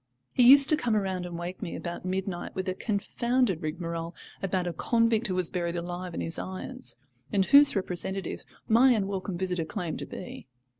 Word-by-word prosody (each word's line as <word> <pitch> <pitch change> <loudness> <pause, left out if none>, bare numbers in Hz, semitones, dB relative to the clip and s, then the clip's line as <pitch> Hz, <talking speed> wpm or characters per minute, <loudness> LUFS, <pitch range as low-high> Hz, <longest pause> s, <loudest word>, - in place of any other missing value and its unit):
He 245 -1 +6
used 280 0 +9
to 310 - +7
come 245 -7 0
round 190 -3 -1
and 170 -1 -6
wake 175 +2 -6
me - - -4
about 175 +1 -6
midnight 185 -1 -3
with 190 0 -3
a 185 - 0
confounded 225 0 0
rigmarole 165 +1 -4 0.3
about 185 -1 -1
a 175 - -2
convict 230 +5 +2
who 185 - -2
was 180 -2 +2
buried 175 -1 -2
alive 175 0 -5
in - - -3
his 165 - -3
irons, 250 - -6 0.3
and 195 -2 +2
whose 280 +2 +7
representative 190 0 -3 0.2
my 245 +3 +6
unwelcome 195 -3 -2
visitor 180 -2 -1
claimed 165 +1 -4
to - - -6
be. - - -9
185 Hz, 185 wpm, -28 LUFS, 175-220 Hz, 0.3 s, used